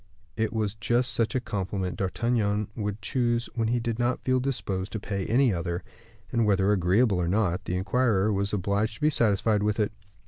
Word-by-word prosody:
It 110 -1 0
was 110 -3 -1
just 120 +2 +1
such 115 +3 +1
a - - +3
compliment 95 -4 -3
D'Artagnan 105 +1 0
would 105 -2 -4
choose 120 +1 0
where 115 -2 0
he 120 +2 +1
did 115 0 -3
not 120 +1 0
feel 130 0 +2
disposed 100 -7 -2
to 110 - -2
pay 100 -1 -3
any 125 -1 +3
other: 85 0 -3 0.5
and, 115 - +2
whether 100 -1 +3
agreeable 100 +2 +3
or 85 - 0
not, 90 -2 0
the 90 - -2
inquirer 105 +1 +1
was 100 +1 0
obliged 105 +3 0
to - - -15
be 155 +1 +3
satisfied 105 -3 +2
with 105 +1 0
it. 105 -1 +1
105 Hz, 195 wpm, -27 LUFS, 100-120 Hz, 0.5 s, a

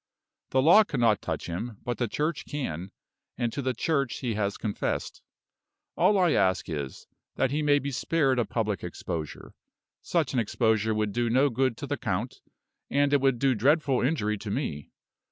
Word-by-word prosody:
The 130 0 +2
law 175 +8 +8
cannot 120 - +1
touch - - -4
him, 105 +6 -5
but 120 -1 -3
the 120 - +1
Church 150 +4 -2
can 95 - -4 0.5
and 120 -2 -1
to 140 - -2
the 130 -1 -1
Church 140 -1 0
he 120 -4 -1
has 100 -1 -1
confessed. 105 -2 -3 0.7
All 195 +3 +4
I 180 -3 +4
ask 95 - +2
is, 70 -5 -5 0.3
that 130 - +1
he 150 +2 0
may 145 -1 +4
be 140 0 -3
spared 135 0 +1
a 120 - +2
public 105 -5 -2
exposure. 80 -3 -6 0.5
Such 160 -6 0
an 130 - +2
exposure 110 -1 +1
would 105 -1 0
do 120 +2 0
no 130 +4 +3
good 130 -1 0
to 145 - -5
the 145 +1 -2
count, 105 +5 -3 0.5
and 145 0 +2
it 140 - +4
would 135 -2 +3
do 135 +2 +2
dreadful 135 +3 +2
injury 110 -7 0
to 105 - -6
me. 100 - -3
125 Hz, 180 wpm, -27 LUFS, 105-140 Hz, 0.7 s, law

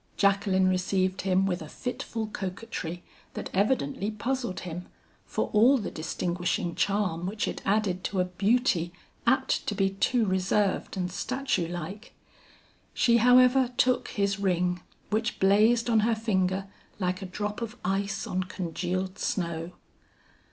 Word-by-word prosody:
Jacqueline 195 -1 +3
received 185 0 +1
him 190 0 +2
with 180 -3 -1
a 155 - -8
fitful 235 -1 -4
coquetry 185 -4 -5 0.3
that - - -5
evidently 200 - +1
puzzled 240 -1 -2
him, 180 0 -6 0.4
for - - -2
all 240 +6 +6
the 210 - -4
distinguishing 175 +3 -2
charm 190 -4 0
which 210 +2 -2
it - - -4
added 195 -3 +1
to 195 - -1
a 180 - +3
beauty 195 -1 +1 0.4
apt - - +2
to - - -1
be 195 -1 +2
too 225 +4 +1
reserved 190 +1 0
and 180 -1 -2
statue 255 -4 -1
like. 175 +6 -7 0.8
She 235 -1 +4
however 250 +1 +5
took 255 0 +3
his 200 -1 -1
ring 180 -2 +1 0.3
which 225 +3 0
blazed 215 +5 +4
on 225 -2 +4
her 225 +2 +2
finger 195 -3 0 0.3
like 185 -1 -1
a 190 - -5
drop 210 +4 -4
of 230 +1 -5
ice 195 +2 -1
on 185 0 -2
congealed 185 +1 -3
snow. 170 -1 -2
195 Hz, 140 wpm, -28 LUFS, 180-220 Hz, 0.8 s, all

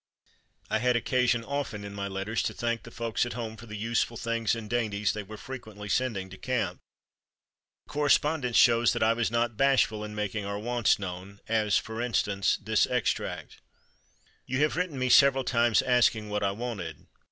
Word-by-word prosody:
I 110 - 0
had 125 +1 +2
occasion 120 0 +1
often 130 -6 -4
in 100 0 -7
my 100 0 -4
letters 100 +3 -2
to - - -3
thank 115 -1 -1
the 115 - -11
folks 115 -1 -1
at 120 - -3
home 115 -2 -5
for 115 +2 -12
the 105 -1 -7
useful 115 +2 -1
things 115 -1 0
and 115 -2 -7
dainties 105 -3 0
they 105 - -4
were 105 +2 -10
frequently 110 -5 -8
sending 110 -5 0
to 95 - -11
camp. 115 -8 -2 1.1
The - - -15
correspondence 145 -3 +2
shows 115 -1 +5
that - - 0
I 110 +1 +4
was 115 0 0
not 115 -1 0
bashful 130 -6 +3
in 105 0 -7
making 105 0 -2
our 100 0 -3
wants 120 +1 +1
known, 95 +1 -7
as, 110 -2 +2
for 110 +2 -4
instance, 100 -4 +1
this 110 +1 +1
extract: 125 -4 -2 0.9
"You 130 +2 -1
have 150 - +1
written 175 -4 -2
me 130 0 0
several 135 0 +6
times 120 -3 +3
asking 120 -4 +2
what 105 0 -1
I 100 - +2
wanted. 100 - -5
115 Hz, 185 wpm, -28 LUFS, 105-125 Hz, 1.1 s, several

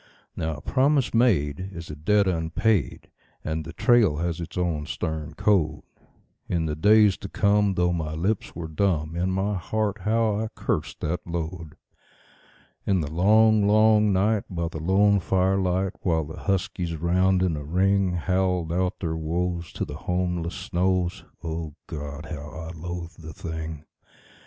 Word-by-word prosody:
Now 80 -1 -2
a 75 - -10
promise 135 - +2
made 95 - +2
is 85 -2 -7
a - - -6
debt 100 +7 +2
unpaid, 85 - 0 0.3
and 80 0 -2
the 85 - -7
trail 105 -3 +3
has 85 +1 -2
its 85 +1 -7
own 80 -4 -1
stern 80 -3 -4
code. 80 -6 +1 0.7
In 85 -2 0
the 75 -1 -2
days 105 +3 +5
to 100 - -8
come, 100 -1 +2
though 90 0 +2
my 80 -2 -3
lips 95 +6 -1
were 80 -1 -5
dumb, 80 -2 0
in 90 +2 0
my 95 +2 0
heart 105 +2 -2
how 110 +1 +1
I 110 - -1
cursed 80 -9 -2
that 80 +3 -1
load. 80 -2 -5 1.1
In 95 -3 +1
the 75 -1 -4
long, 105 +4 +4
long 105 0 +5
night, 100 +2 +2
by 85 -2 -2
the 80 -2 -6
lone 100 +4 +4
firelight, 95 0 +1
while 80 -3 +1
the 80 +2 -8
huskies, 90 -3 -1
round 90 +3 +2
in 90 -4 +1
a 75 - -5
ring, 95 +4 +2
Howled 90 -1 0
out 90 +1 -1
their 80 -3 -1
woes 85 +2 -2
to - - -2
the - - -8
homeless 90 -1 -2
snows 90 0 -1 0.2
O 80 -2 -4
God! 75 0 -6
how 75 -2 -7
I 80 +1 -7
loathed 85 +1 -7
the 80 0 -9
thing. 80 -1 -6
90 Hz, 160 wpm, -25 LUFS, 80-100 Hz, 1.1 s, days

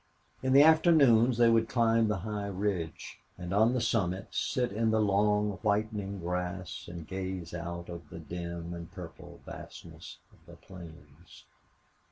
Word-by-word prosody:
In 130 0 +1
the 140 +1 +8
afternoons 140 -8 +5
they 120 -1 +5
would 115 0 +2
climb 115 -2 +3
the 105 -4 -1
high 105 -2 -3
ridge, 95 -4 -3 0.2
and 90 +1 -5
on 110 +4 +4
the - - +1
summit 95 -5 -1
sit 125 -1 -1
in 110 +2 0
the 110 0 +2
long 105 0 +2
whitening 105 -2 -1
grass 90 0 -4
and 85 -2 -8
gaze 95 -3 -5
out 85 0 -5
over 85 -1 -7
the - - -7
dim 85 0 -6
and 85 0 -8
purple 85 -3 -11
vastness - - -10 0.2
of - - -24
the - - -12
plains. 85 -3 -14
100 Hz, 155 wpm, -30 LUFS, 85-115 Hz, 0.2 s, the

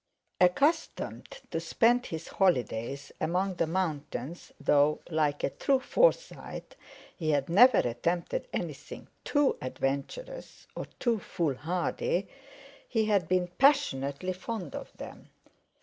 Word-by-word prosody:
Accustomed 280 - +1 0.2
to - - -1
spend 245 +1 +2
his 165 0 -6
holidays 135 - 0
among 185 +3 0
the 165 - +1
mountains, 160 -3 -3
though 145 +1 +3
(like 150 -2 +1
a - - +1
true 270 -1 +1
Forsyte) - - 0 0.4
he 160 -3 -2
had 145 -1 +1
never 245 +9 +7
attempted 170 - -1
anything - - -6
too 290 -2 +2
adventurous 140 - -4
or - - -4
too 235 -3 +1
foolhardy, 175 - -1 0.6
he 220 -2 +1
had 200 -6 +2
been 180 0 +1
passionately 185 - +2
fond 185 -2 -5
of - - -7
them. - - -10
180 Hz, 115 wpm, -29 LUFS, 145-240 Hz, 0.6 s, never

